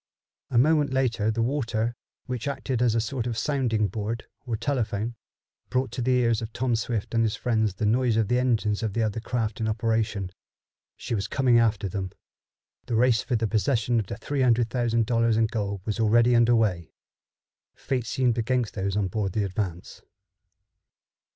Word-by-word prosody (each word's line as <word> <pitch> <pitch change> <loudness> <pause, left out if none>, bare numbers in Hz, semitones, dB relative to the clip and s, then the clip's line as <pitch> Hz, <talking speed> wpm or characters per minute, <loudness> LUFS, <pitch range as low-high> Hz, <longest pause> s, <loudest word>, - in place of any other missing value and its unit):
A 120 - 0
moment 145 +2 +4
later 120 -5 +1
the 115 +1 0
water, 120 -3 -1 0.3
which 125 -1 -4
acted 130 -3 -2
as 120 -2 +3
a - - +3
sort 120 +1 -2
of 115 -2 -3
sounding 115 -5 +1
board, 110 +3 -4 0.2
or 115 -2 -1
telephone, 115 -4 -1 0.6
brought 130 -2 0
to 125 - -4
the 125 - 0
ears 115 -3 +2
of 110 0 -5
Tom 120 -1 0
Swift 115 -1 -3
and 115 - +3
his 110 -2 0
friends 110 -5 0
the 105 - -2
noise 115 +1 +2
of 110 -2 +2
the 125 +3 +2
engines 110 -4 +1
of 110 -3 -2
the 115 - +1
other 110 0 -1
craft 115 -2 -2
in 110 - 0
operation. 110 -3 -1 0.7
She - - -5
was 100 -3 -1
coming 125 -1 +3
after 110 -3 +1
them. 95 0 -4 0.8
The 120 - -1
race 115 -1 +3
for 125 - -2
the 115 0 0
possession 115 +2 +1
of 105 - -3
three 135 +8 -3
hundred 120 -2 +3
thousand 115 -2 +1
dollars 115 -1 +2
in 115 - +4
gold 100 -3 -3
was 110 +1 -2
already 115 +2 +4
under 120 0 +5
way. 90 -7 0 0.8
Fate 125 -4 -3
seemed 125 -2 +1
against 120 -1 0
those 95 0 -2
on 100 -2 +1
board 95 -1 -2
the 105 - 0
Advance. 95 -3 -4
115 Hz, 185 wpm, -26 LUFS, 110-125 Hz, 0.8 s, under